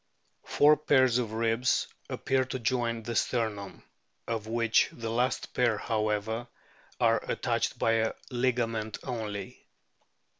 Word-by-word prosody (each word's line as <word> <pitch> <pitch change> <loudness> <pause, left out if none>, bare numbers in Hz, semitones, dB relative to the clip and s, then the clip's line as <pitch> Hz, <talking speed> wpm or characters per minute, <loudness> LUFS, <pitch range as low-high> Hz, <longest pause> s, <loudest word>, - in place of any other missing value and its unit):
Four 150 +1 +5
pairs 130 -5 +3
of 115 -3 -2
ribs 115 +2 +1 0.2
appear 130 -1 0
to 130 - -4
join 115 -1 -1
the 115 +1 -4
sternum, 110 -6 -1 0.4
of 110 -2 -3
which 115 0 +2
the 115 -1 -5
last 125 +3 -1
pair, 120 -3 +2
however, 110 +2 -1 0.5
are - - +3
attached - - -1
by 115 - +2
a 110 0 +1 0.2
ligament 120 -3 0
only. 105 -6 -5
115 Hz, 120 wpm, -29 LUFS, 110-125 Hz, 0.5 s, Four